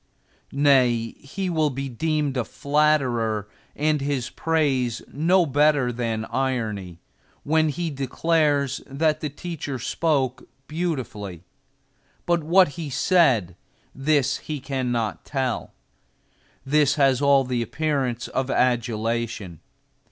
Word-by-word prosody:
Nay, 130 -5 +3
he 190 +7 -5
will 160 -4 +1
be 135 0 -4
deemed 150 +2 -1
a 125 - 0
flatterer 130 -8 +1 0.3
and 150 0 +1
his 140 -3 -2
praise 135 -7 0
no 170 +5 +2
better 145 -3 +3
than 115 -2 -2
irony, 110 -9 -2 0.5
when 155 +1 +2
he 165 +2 -3
declares 140 0 0
that 155 +3 0
the 150 - -3
teacher 145 -2 -5
spoke 130 -1 -1 0.2
beautifully; 125 - -4 0.8
but 170 -2 +1
what 180 +2 +5
he 155 0 -6
said, 130 - +3 0.4
this 140 -1 +1
he 150 -2 -5
cannot 125 -5 -2
tell. 130 -4 -2 0.9
This 145 0 +3
has 135 -2 +3
all 140 -1 +5
the 125 -2 -2
appearance 130 -2 -1
of 130 0 -2
adulation. 115 - -1
135 Hz, 110 wpm, -24 LUFS, 120-150 Hz, 0.9 s, what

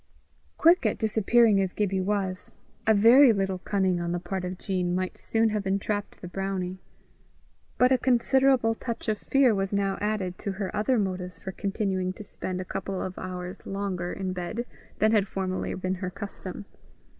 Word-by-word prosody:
Quick 340 +3 +5
at - - +1
disappearing 220 -1 +3
as 190 -1 -1
Gibbie 195 -2 0
was, 190 -1 -2 0.3
a 220 - +6
very 235 +6 +8
little 195 -3 -1
cunning 190 -2 0
on 170 0 -2
the 175 - -1
part 190 +1 -4
of 180 0 -4
Jean 180 -2 -1
might 185 0 -2
soon 225 0 +1
have 210 -2 -2
entrapped 200 +1 -2
the 180 - -6
brownie; 185 0 -3 1.0
but 250 +1 +4
a 260 - +4
considerable 255 -1 +3
touch 230 0 -5
of 215 -1 0
fear 270 -4 +3
was 195 -1 -1
now 200 -1 0
added 205 -4 -2
to 200 - -3
her 190 0 -4
other 215 +5 +2
motives 185 -3 -2
for 190 - -6
continuing 190 -2 -2
to 210 - -9
spend 185 -2 -5
a 185 - -4
couple 195 0 -4
of 185 - -5
hours 180 -1 -6
longer 195 -3 -3
in 190 -2 -3
bed 185 +7 -4 0.3
than 215 +1 +3
had 210 -3 +3
formerly 190 -1 -3
been 185 0 -2
her 185 - -2
custom. 200 0 -7
195 Hz, 180 wpm, -27 LUFS, 185-215 Hz, 1.0 s, very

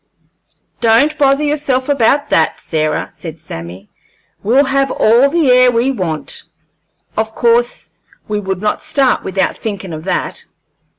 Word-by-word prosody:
"Don't 235 +7 +3
bother 275 +1 +3
yourself 290 -3 0
about 280 0 +1
that, 160 -1 +2
Sarah," 155 -1 -2
said 165 -2 -9
Sammy. 90 - -9 0.5
"We'll 250 +7 +3
have 270 0 +1
all 240 +5 +3
the 315 -4 +2
air 250 0 +6
we 245 +2 +1
want; 175 - -2 0.7
of 220 0 -2
course 240 +1 +1 0.4
we 210 -1 -2
would 190 -2 -4
not 210 - -1
start 270 -3 +1
without 190 0 -1
thinkin' 200 -5 -5
of 155 +1 -7
that." 185 - -2
230 Hz, 135 wpm, -15 LUFS, 185-270 Hz, 0.7 s, air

